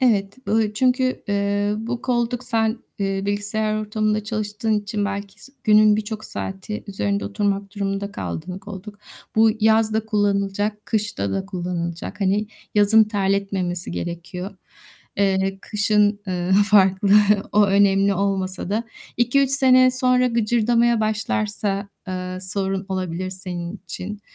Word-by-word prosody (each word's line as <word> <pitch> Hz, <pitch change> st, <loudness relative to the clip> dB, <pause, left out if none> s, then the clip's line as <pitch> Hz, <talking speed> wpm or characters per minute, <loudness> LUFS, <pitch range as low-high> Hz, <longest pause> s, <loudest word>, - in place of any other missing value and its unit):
Evet. 205 Hz, -5 st, +2 dB
Bu 220 Hz, -1 st, +1 dB
çünkü, 255 Hz, +1 st, +1 dB
eee, 205 Hz, +1 st, 0 dB
bu 235 Hz, +2 st, -4 dB
koltuk 245 Hz, 0 st, -1 dB
sen, 225 Hz, -1 st, 0 dB, 0.2 s
eee, 195 Hz, -1 st, -1 dB
bilgisayar 210 Hz, +1 st, -1 dB
ortamında 215 Hz, 0 st, -1 dB
çalıştığın 215 Hz, 0 st, -2 dB
için 205 Hz, 0 st, -3 dB
belki 200 Hz, 0 st, -5 dB
s 270 Hz, -, -15 dB
günün 215 Hz, -1 st, +6 dB
birçok 215 Hz, 0 st, -4 dB
saati 195 Hz, +2 st, -6 dB
üzerinde 200 Hz, 0 st, -2 dB
oturmak 200 Hz, 0 st, -2 dB
durumunda 200 Hz, 0 st, -3 dB
kaldığın 180 Hz, -1 st, -5 dB
koltuk. 205 Hz, +1 st, -10 dB, 0.4 s
Bu 220 Hz, 0 st, +6 dB
yaz 220 Hz, 0 st, +4 dB
da 220 Hz, 0 st, 0 dB
kullanılacak 205 Hz, 0 st, 0 dB
kışta 205 Hz, -, -1 dB
da 190 Hz, 0 st, -2 dB
kullanılacak. 175 Hz, -1 st, -4 dB
Hani 200 Hz, +2 st, +1 dB, 0.3 s
yazın 210 Hz, +2 st, +6 dB
terletmemesi 195 Hz, -3 st, -1 dB
gerekiyor. 180 Hz, +3 st, -5 dB, 0.6 s
Eee, 195 Hz, -1 st, +1 dB
kışın, 210 Hz, -1 st, +2 dB
ııı, 180 Hz, 0 st, -1 dB
farklı. 200 Hz, -1 st, +4 dB, 0.4 s
O 210 Hz, 0 st, +5 dB
önemli 195 Hz, 0 st, +3 dB
olmasa 190 Hz, -1 st, -2 dB
da 225 Hz, +3 st, 0 dB, 0.3 s
2-3 255 Hz, +3 st, +2 dB
sene 255 Hz, -2 st, +5 dB
sonra 255 Hz, 0 st, +2 dB
gıcırdamaya 235 Hz, 0 st, +2 dB
başlarsa, 210 Hz, -2 st, -1 dB, 0.2 s
ııı, 185 Hz, 0 st, -4 dB
sorun 190 Hz, +1 st, -2 dB
olabilir 185 Hz, -1 st, -3 dB
senin 180 Hz, -1 st, -6 dB
için. 205 Hz, +2 st, -6 dB
205 Hz, 125 wpm, -22 LUFS, 195-220 Hz, 0.6 s, günün